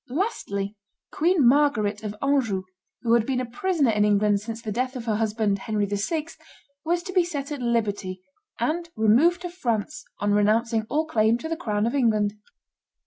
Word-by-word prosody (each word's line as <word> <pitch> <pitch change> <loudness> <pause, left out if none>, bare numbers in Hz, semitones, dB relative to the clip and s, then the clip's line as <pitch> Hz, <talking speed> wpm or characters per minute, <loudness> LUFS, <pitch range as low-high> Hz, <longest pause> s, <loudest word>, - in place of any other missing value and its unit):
Lastly, 215 - -2 0.4
Queen 325 -4 +3
Margaret 235 -7 +3
of 210 -1 -5
Anjou, 250 -9 +1 0.4
who 230 -1 +2
had 235 -1 +4
been 255 +2 -1
a 255 - -2
prisoner 285 +2 +1
in 210 -1 +2
England 205 0 +3
since 225 +2 -6
the 225 -2 -5
death 255 +4 -2
of 240 -2 -5
her 215 -3 0
husband, 215 -2 0
Henry 210 0 -1
VI., 205 - -2 0.6
was 345 +2 0
to 370 0 -7
be 365 -2 +4
set 295 -5 -5
at 290 -3 -4
liberty, 205 -6 -1 0.4
and 330 +8 -1
removed 280 - +3
to 355 - -3
France, 305 - -2
on 205 0 0
renouncing 220 +2 +2
all 310 +2 +1
claim 225 -6 +2
to 280 - -6
the 330 - -2
crown 210 -10 -1
of 235 - -1
England. 215 -6 +2
230 Hz, 180 wpm, -25 LUFS, 210-295 Hz, 0.6 s, had